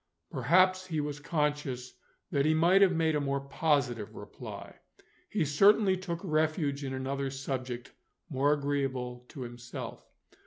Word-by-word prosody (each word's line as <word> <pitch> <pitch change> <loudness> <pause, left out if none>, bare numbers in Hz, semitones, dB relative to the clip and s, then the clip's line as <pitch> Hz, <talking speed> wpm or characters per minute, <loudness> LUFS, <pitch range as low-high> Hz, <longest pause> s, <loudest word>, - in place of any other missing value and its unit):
Perhaps 185 +8 +3
he 160 -4 -1
was 145 -1 -3
conscious 145 -5 -1 0.4
that 140 -1 +2
he 155 +2 +3
might 175 +5 +5
have 195 -2 +7
made 160 -1 +2
a 150 - +1
more 140 0 0
positive 140 - 0
reply. - - -9 0.5
He 195 -7 +1
certainly 195 +6 +5
took 180 -2 -4
refuge 155 -2 0
in 135 - -3
another 135 +1 -2
subject 130 -2 -4 0.4
more 145 -2 +2
agreeable 135 -4 -1
to 135 - -9
himself. 120 -1 -7
145 Hz, 140 wpm, -30 LUFS, 130-160 Hz, 0.5 s, have